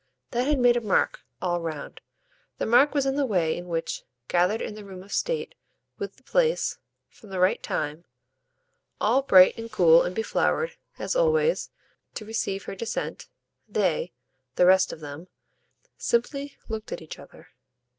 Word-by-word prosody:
That 245 +2 0
had 295 -1 +3
made 245 -1 +5
a - - 0
mark, 210 -4 +1 0.2
all 175 -1 0
round; 155 -3 -6 0.6
the - - -1
mark 265 +6 +4
was 280 -2 +2
in 270 +1 0
the 285 - +2
way 175 -7 +1
in 175 +1 -7
which, 165 -1 -3 0.3
gathered 180 +5 +2
in - - -4
the 210 0 -9
room 190 -2 -10
of 200 - -10
state, - - -1 0.5
with 405 - -5
the - - -25
place, - - +1 0.3
from 215 - -18
the 190 -1 -4
right 185 +1 +3
time, 150 +4 -3 0.9
all 235 +6 +3
bright 185 -9 +7
and 230 0 -7
cool 170 -5 +6
and 180 - -2
beflowered, 345 - 0 0.2
as - - -2
always, 475 -1 +2 0.5
to 215 - -6
receive 200 -3 -2
her - - -6
descent, 220 +4 -4 0.4
they 180 -4 0 0.4
the 180 - +5
rest 185 +1 +5
of - - -9
them 145 +4 -8 0.7
simply 275 +4 -1
looked 220 -1 -5
at - - -5
each 155 - -9
other. 140 - -15
210 Hz, 165 wpm, -26 LUFS, 180-270 Hz, 0.9 s, bright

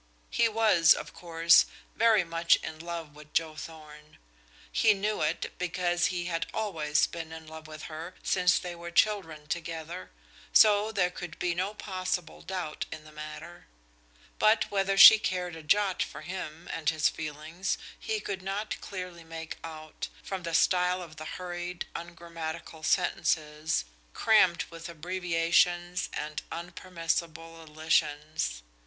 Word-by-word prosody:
He 230 -1 +3
was, 210 -7 +5
of - - -7
course, 165 0 +4 0.3
very 225 -4 +5
much 170 0 +3
in 155 - -6
love 165 -2 -6
with 150 0 -14
Joe 160 -1 +1
Thorn; 155 -1 -11 0.5
he 215 -2 +4
knew 210 +2 -1
it, 155 +3 -1
because 180 0 +1
he 175 -1 -3
had 165 -1 -2
always 160 -9 +1
been 165 -1 -7
in 160 0 -9
love 160 0 -10
with 155 0 -9
her 165 +3 -7
since 180 -2 +3
they 180 -1 -4
were 170 0 -8
children 170 -5 +1
together, 165 +2 -5 0.4
so 210 0 +6
there 180 -4 +1
could 175 -2 -8
be 175 -1 0
no 190 +4 -2
possible 185 -4 -3
doubt 180 -5 -4
in 155 - -7
the 155 - -14
matter. 150 0 -9 0.7
But 215 +1 +4
whether 195 -1 +1
she 215 +2 +12
cared 180 -4 -2
a 160 - -8
jot 195 +5 +2
for - - -4
him 175 -2 -6
and 155 -3 0
his 155 -2 +2
feelings 155 +4 -3 0.2
he 440 -1 -2
could 195 - -4
not 195 +3 -3
clearly 180 -3 -7
make 165 0 -7
out, 155 -1 -7 0.2
from 190 -1 -4
the 170 -1 -2
style 180 +1 +3
of 160 -2 -12
the 155 - -7
hurried, 175 -1 -5
ungrammatical 165 -2 -7
sentences, 155 - +1 0.3
crammed 195 -6 +4
with 165 0 -8
abbreviations 175 +1 +1
and 150 0 -4
unpermissible 165 -1 -4
elisions. 150 - -1
170 Hz, 145 wpm, -29 LUFS, 160-185 Hz, 0.7 s, she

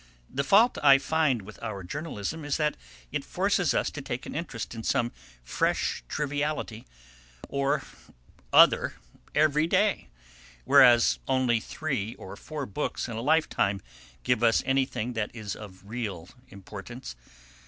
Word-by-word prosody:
"The 140 - -1
fault 215 - +4
I 140 -2 +8
find 140 -6 +1
with 105 +2 -12
our 105 -4 -5
journalism 150 - -5
is 145 -1 -1
that 150 -1 0 0.4
it - - -2
forces - - +1
us - - +1
to - - -6
take - - -5
an - - -7
interest - - -5
in 115 - -6
some 120 +1 0 0.3
fresh - - 0
triviality 145 -5 -3 0.6
or 140 +1 0 0.7
other - - +6 0.4
every 150 +1 +3
day, 200 +4 +1 0.6
whereas 120 -1 +6
only 130 -3 +2
three 120 -5 -3
or 95 - -9
four 150 +6 -6
books 100 - -3
in 115 - -6
a 115 - -3
lifetime 130 -9 +2 0.4
give 125 -3 +1
us 115 -1 +4
anything 130 -3 0
that 110 -2 -2
is 105 -4 -5
of 95 -3 -11
real 105 -7 -5 0.2
importance. 100 - -9
125 Hz, 140 wpm, -27 LUFS, 110-150 Hz, 0.7 s, I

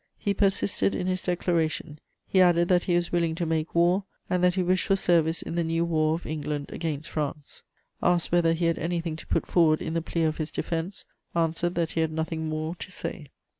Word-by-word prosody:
He 200 - 0
persisted 200 0 +1
in 180 - -2
his 185 0 -1
declaration: 165 -4 -1 0.3
he 190 - +4
added 175 -1 +4
that 180 -1 +3
he 175 - +2
was 175 0 0
willing 170 -2 +1
to 170 - -2
make 160 0 -2
war, 175 +3 +3 0.3
and 180 0 +1
that 180 0 +4
he 185 - +1
wished 185 +1 +1
for 195 - +4
service 165 -3 +2
in - - -5
the 170 0 +1
new 165 +1 0
war 155 -2 +2
of 170 - -7
England 150 -2 -4
against 155 -2 -3
France. 150 -1 -4 0.4
"Asked 175 -1 +2
whether 170 -1 +4
he 165 +1 -1
had 165 0 +1
anything 165 -1 -2
to - - -11
put - - 0
forward 160 -3 +3
in 160 - -4
the 165 - 0
plea 165 0 -2
of 155 -1 0
his 155 -1 -3
defense; 170 +3 -4 0.3
answered 170 +1 0
that 165 -1 0
he 165 - 0
had 160 -1 0
nothing 160 0 -3
more 155 +1 -2
to 185 - -8
say. 165 -4 -5
165 Hz, 220 wpm, -27 LUFS, 160-175 Hz, 0.4 s, he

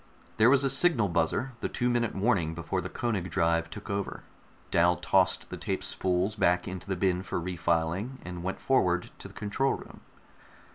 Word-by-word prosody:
There 110 +2 +6
was 140 +1 +5
a 135 - +2
signal 135 - +3
buzzer, 85 +10 0
the - - -2
two 125 - -1
minute 120 -2 0
warning 95 -6 +1
before 85 +3 -2
the - - -5
Koenig 100 -7 -2
drive 85 0 +1
took 105 - -9
over. 100 -2 -3 0.5
Dal 85 +1 +4
tossed 95 -1 +1
the - - -5
tape - - -3
spools 95 +3 0
back 90 -3 +2
into 95 0 -6
the 95 - 0
bin 90 0 +1
for 95 - -3
refiling, 90 +6 -1
and 90 0 -6
went 95 +2 -3
forward 90 -9 +1
to - - -7
the - - -15
control 120 +6 0
room. - - -12
95 Hz, 185 wpm, -29 LUFS, 85-110 Hz, 0.5 s, There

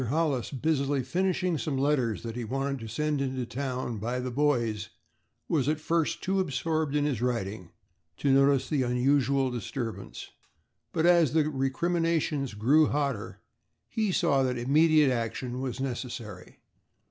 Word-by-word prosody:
Hollis, 145 -4 0
busily 140 -1 0
finishing 180 +3 0
some 145 -4 -2
letters 130 -6 +1
that 115 -1 -5
he 120 - -3
wanted 135 +4 -2
to 115 - -7
send 150 +5 -1
into 130 -2 -2
town 125 -2 -3
by 120 +4 -2
the 125 0 -3
boys, 120 -7 0 0.6
was 145 -4 +1
at 155 0 0
first 165 0 0
too 195 +1 +1
absorbed 155 -2 -1
in 145 -1 +2
his 135 -6 -1
writing 105 -7 -2 0.5
to 140 - +1
notice 135 -1 +4
the 140 0 0
unusual 130 +1 +2
disturbance, 120 0 -5 0.6
but 160 - 0
as 170 -6 +5
the 155 -2 +3
recriminations 155 -1 0
grew 140 +9 +4
hotter 140 -7 -2 0.5
he 215 -3 -1
saw 155 -6 +2
that 130 -1 0
immediate 150 +3 +4
action 125 +1 -3
was 130 -3 -4
necessary. 120 -7 -6
135 Hz, 145 wpm, -28 LUFS, 125-150 Hz, 0.6 s, as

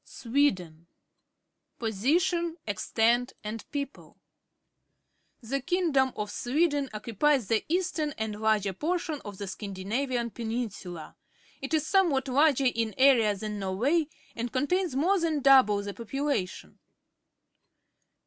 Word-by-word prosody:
SWEDEN 190 - -1 0.9
Position, 320 - 0
Extent, 230 +4 +1
and 215 +1 -6
People. 280 -1 -6 0.7
— - - -47
The 275 0 0
king 350 +5 0
dom 265 -2 +3
of 210 -1 -4
Sweden 290 +1 0
occupies 230 +4 +1
the 225 -1 +2
eastern 330 -4 -1
and 215 -1 -4
larger 215 -3 +2
portion 320 - -2
of 205 -2 -8
the 200 - -5
Scandinavian 225 +6 -3
Peninsula. 220 -9 -5 0.5
It 275 +4 -1
is 310 -1 0
somewhat 315 -8 +2
larger 275 0 +3
in 230 -3 0
area 245 -6 +5
than 210 +1 -5
Norway 245 - +1 0.3
and 235 0 -3
contains 320 +4 0
more 365 +8 +2
than 325 -3 0
d()u])le 255 -7 +6
the 200 - -4
population. 235 -4 -3
250 Hz, 120 wpm, -28 LUFS, 210-295 Hz, 0.9 s, d()u])le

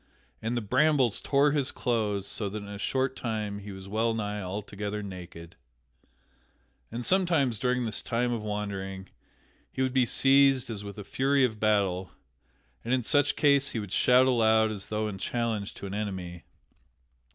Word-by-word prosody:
And 115 +2 -2
the - - 0
brambles 130 +1 +2
tore 140 +1 +3
his 140 -3 +3
clothes, 105 -5 -1
so 105 -1 -2
that 105 +1 -6
in - - -10
a 100 0 -8
short 130 +3 -1
time 105 -3 -3
he 100 0 -9
was 95 0 -9
wellnigh 110 -1 -1
altogether 105 +2 -5
naked. 90 -3 -9 1.4
And 120 +2 -4
somewhiles 165 - +2
during 125 -1 0
this 110 -2 0
time 120 +1 -1
of 115 - -3
wandering 100 -2 -5 0.6
he 130 - -1
would 130 -1 -1
be 130 -2 +3
seized 135 -1 +4
as 105 -2 -5
with 100 0 -8
a 105 - -6
fury 135 +5 +2
of 110 -4 -4
battle, 95 -5 +1 0.7
and 120 +3 +1
in 125 - -2
such 145 +3 +3
case 140 -2 +3
he 115 - -2
would 105 -3 -7
shout 125 +1 +5
aloud 110 -3 +3
as 100 -2 -5
though 110 0 -2
in 95 -2 -6
challenge 115 -3 -2
to - - -8
an 95 - -6
enemy. 95 -4 -5
110 Hz, 170 wpm, -28 LUFS, 100-125 Hz, 1.4 s, shout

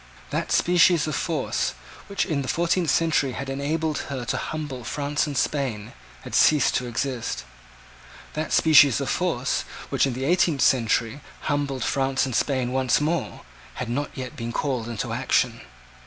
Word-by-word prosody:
That - - -2
species 175 -2 +4
of 155 - -3
force, 160 -5 -1 0.3
which, 200 - -1
in 155 -6 -1
the 130 - -5
fourteenth 170 +1 +1
century 150 -4 +2
had 135 +1 -5
enabled 150 +3 -1
her 130 -3 -4
to - - -1
humble 150 -5 -5
France 145 +6 -1
and 145 -2 -4
Spain, 120 -8 -1 0.3
had - - -9
ceased 150 -3 +4
to 125 - -4
exist. 120 0 -3 0.9
That 155 +1 -3
species 145 -6 +6
of - - -2
force, - - 0 0.3
which, - - +3
in 130 - -2
the 130 +2 -3
eighteenth 165 -3 +2
century, 120 +1 +2 0.2
humbled 140 -3 -1
France 135 -1 +1
and 130 -3 -3
Spain 130 -2 0
once 130 -1 +2
more, 155 +1 -2 0.3
had 125 - -4
not 145 +4 -2
yet 130 +3 -6
been 115 -3 -5
called 125 -2 -2
into 115 -3 -3
action. - - +1
140 Hz, 160 wpm, -24 LUFS, 130-155 Hz, 0.9 s, species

